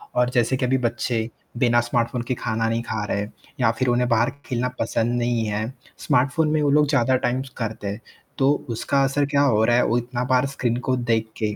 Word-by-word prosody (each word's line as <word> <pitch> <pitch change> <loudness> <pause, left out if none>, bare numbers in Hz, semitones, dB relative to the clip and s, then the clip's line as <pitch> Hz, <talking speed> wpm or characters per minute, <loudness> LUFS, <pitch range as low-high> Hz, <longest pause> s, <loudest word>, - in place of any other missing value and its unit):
और 125 0 +3
जैसे 125 +1 +1
कि 130 - 0
अभी 130 +1 +2
बच्चे 120 -2 -1 0.3
बिना 120 -1 +3
स्मार्टफोन 120 0 -1
के - - 0
खाना 115 -1 -1
नहीं 115 +1 0
खा 110 -2 -3
रहे 100 - -1
हैं, 105 +1 -4 0.3
या 115 -3 +3
फिर 130 - +1
उन्हें 125 0 +2
बाहर 115 0 +3 0.2
खेलना 125 -1 -1
पसंद 115 +1 0
नहीं 120 -1 0
है 105 +1 -1 0.4
स्मार्टफोन 140 +5 +2
में 155 0 +2
वो 145 - +2
लोग 150 0 +4
ज़्यादा 130 -3 +3
टाइम 125 0 0 0.2
करते 110 -3 -4
हैं, 100 +3 -5 0.4
तो 135 +1 +4 0.2
उसका 135 +4 0
असर 140 +2 +1
क्या 140 0 +1
हो 115 -6 +3
रहा 120 - +3
है 125 - +4
वो 120 - +1
इतना 120 +1 -3
बार 125 +1 +3
स्क्रीन 120 -3 0
को 130 - +3
देख 115 -2 0
के 105 -1 -1
120 Hz, 225 wpm, -23 LUFS, 115-130 Hz, 0.4 s, लोग